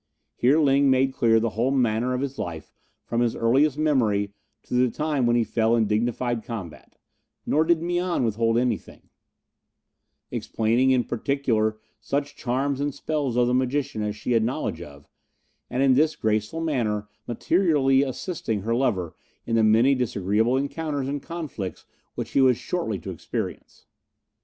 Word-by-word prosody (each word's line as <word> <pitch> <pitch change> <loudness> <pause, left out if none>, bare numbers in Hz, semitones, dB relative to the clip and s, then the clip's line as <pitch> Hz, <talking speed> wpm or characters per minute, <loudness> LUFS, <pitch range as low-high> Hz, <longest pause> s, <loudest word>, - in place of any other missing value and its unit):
Here 130 +5 +3
Ling 140 -2 +4
made 130 0 +3
clear 115 -2 +3
the 115 0 -1
whole 120 +4 0
manner 125 -1 +1
of 125 - -2
his 140 0 -4
life 80 -3 -6 0.3
from 120 0 -1
his 120 -2 +1
earliest 135 +5 +2
memory 110 -10 +1 0.3
to - - -9
the 125 0 +3
time 150 -2 0
when 120 - +3
he 120 - +3
fell 110 +1 +1
in 115 -2 +2
dignified 120 +2 -1
combat, 100 -9 -8 0.5
nor 155 - +2
did 165 0 +2
Mian 175 -3 0
withhold 115 0 +1
anything, 125 +1 -2 1.2
explaining 115 +4 +1
in 130 -2 +3
particular 115 -5 0 0.2
such 140 +6 -3
charms 135 +2 -1
and 145 -1 -2
spells 145 -5 -2
of 125 - +4
the 125 - +1
magician 130 -2 0
as 105 0 -2
she 105 +3 -4
had 115 -2 +3
knowledge 115 - -2
of, 70 -4 -12 0.6
and 130 +2 0
in 135 -1 +5
this 155 +4 +3
graceful 110 +8 -1
manner 110 -10 -1 0.2
materially 135 - +2
assisting 130 - -3
her 115 +4 -1
lover 105 -10 0 0.3
in 115 - -1
the 115 - +4
many 115 +5 +5
disagreeable 115 -1 +1
encounters 140 0 -2
and 140 0 -3
conflicts 150 - -6 0.3
which - - -5
he 135 - +3
was 130 -3 +4
shortly 165 - -3
to 80 - -7
experience. - - -6
125 Hz, 160 wpm, -25 LUFS, 110-140 Hz, 1.2 s, in